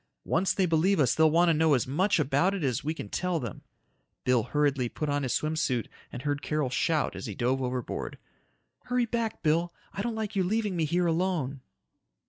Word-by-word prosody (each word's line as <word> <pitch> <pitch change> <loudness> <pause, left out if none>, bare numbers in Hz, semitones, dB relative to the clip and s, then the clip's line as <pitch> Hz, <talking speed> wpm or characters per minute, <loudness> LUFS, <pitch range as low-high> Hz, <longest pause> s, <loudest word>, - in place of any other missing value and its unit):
Once 180 +4 +1
they 190 - +2
believe 175 +3 +2
us 135 - +4
they'll 160 0 +5
want 170 +3 +4
to - - +5
know 155 -1 +4
as 125 - 0
much 185 +11 +2
about 150 +7 +2
it 190 - -3
as 130 -3 0
we 155 - -1
can 160 - -6
tell 180 - -1
them." 120 -7 -6 0.6
Bill 125 -2 +3
hurriedly 140 0 0
put 150 +4 -3
on 145 0 0
his 130 -3 -2
swim 155 +1 -1
suit 130 -7 0 0.2
and 125 - -7
heard 145 -1 -1
Carol 150 -4 -1
shout 155 +3 +1
as - - -6
he 105 - -5
dove 130 +4 0
overboard, 125 -1 -3 0.7
"Hurry 250 -1 +1
back, 230 -1 -3
Bill. 165 +2 +2 0.2
I - - -3
don't 235 +1 -2
like 220 -1 -4
you 190 - +2
leaving 205 +1 0
me 165 -2 +1
here 175 +4 +1
alone!" 165 -6 0
155 Hz, 210 wpm, -28 LUFS, 135-180 Hz, 0.7 s, they'll